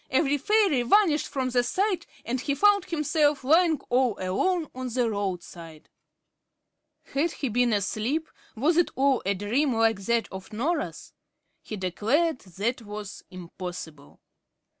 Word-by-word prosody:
every 275 Hz, +2 st, +2 dB
fairy 380 Hz, -, +2 dB
vanished 310 Hz, -, +3 dB
from 260 Hz, -2 st, -2 dB
sight, 345 Hz, -, 0 dB, 0.2 s
and 245 Hz, +2 st, -2 dB
he 280 Hz, 0 st, -1 dB
found 405 Hz, +4 st, +4 dB
himself 300 Hz, -3 st, +1 dB
lying 320 Hz, +2 st, +4 dB
all 250 Hz, -3 st, +2 dB
alone 310 Hz, -, 0 dB
on 255 Hz, 0 st, -5 dB
the 245 Hz, 0 st, 0 dB
roadside. 175 Hz, -6 st, -5 dB, 1.2 s
Had 310 Hz, +5 st, +1 dB
he 270 Hz, -, -3 dB
been 245 Hz, +2 st, +2 dB
asleep? 220 Hz, +9 st, -1 dB, 0.3 s
was 305 Hz, +9 st, +2 dB
it 350 Hz, -, +3 dB
all 270 Hz, -1 st, +2 dB
a 200 Hz, -, +2 dB
dream, 235 Hz, +7 st, 0 dB
like 225 Hz, -2 st, +2 dB
that 235 Hz, -1 st, +1 dB
of 190 Hz, 0 st, -9 dB
Norah's? 285 Hz, +11 st, -3 dB, 0.5 s
He 215 Hz, -, -7 dB
declared 230 Hz, -, 0 dB
that 205 Hz, +7 st, -3 dB
was 210 Hz, -2 st, -8 dB
impossible. 175 Hz, -4 st, -9 dB
250 Hz, 135 wpm, -26 LUFS, 205-305 Hz, 1.2 s, found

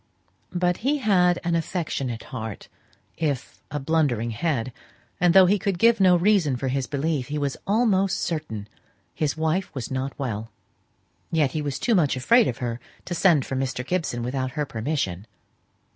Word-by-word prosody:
But 180 Hz, 0 st, +1 dB
he 280 Hz, +5 st, +1 dB
had 180 Hz, -8 st, +3 dB
an 170 Hz, 0 st, 0 dB
affectionate 155 Hz, -8 st, -2 dB
heart, 110 Hz, -4 st, -6 dB, 0.5 s
if 145 Hz, -6 st, -3 dB
a 150 Hz, -, -3 dB
blundering 135 Hz, -6 st, +1 dB
head; 130 Hz, -1 st, -1 dB, 0.5 s
and 175 Hz, 0 st, +3 dB
though 190 Hz, -1 st, +9 dB
he 200 Hz, +3 st, +3 dB
could 195 Hz, -3 st, -1 dB
give 230 Hz, +4 st, +4 dB
no 185 Hz, -2 st, +6 dB
reason 175 Hz, -6 st, +3 dB
for 130 Hz, +2 st, -2 dB
his 130 Hz, -1 st, -1 dB
belief, 140 Hz, 0 st, -1 dB
he 150 Hz, -, -3 dB
was 140 Hz, -2 st, -1 dB
almost 200 Hz, -3 st, +2 dB
certain 130 Hz, -11 st, -3 dB, 0.5 s
his 150 Hz, -1 st, -1 dB
wife 160 Hz, +4 st, 0 dB
was 130 Hz, -2 st, -5 dB
not 130 Hz, +1 st, -3 dB
well. 115 Hz, -5 st, -4 dB, 0.8 s
Yet 150 Hz, -5 st, +2 dB
he 155 Hz, -, -2 dB
was 145 Hz, -3 st, -3 dB
too 235 Hz, -, +1 dB
much 160 Hz, -10 st, +3 dB
afraid 225 Hz, -, +4 dB
of 120 Hz, -, -2 dB
her 120 Hz, -1 st, -3 dB, 0.3 s
to 175 Hz, -, -4 dB
send 170 Hz, -6 st, +4 dB
for 135 Hz, -, -4 dB
Mr. 130 Hz, -1 st, -2 dB
Gibson 155 Hz, -8 st, -2 dB
without 130 Hz, +1 st, -2 dB
her 150 Hz, -1 st, -1 dB
permission. 110 Hz, -, -3 dB
150 Hz, 170 wpm, -24 LUFS, 130-180 Hz, 0.8 s, though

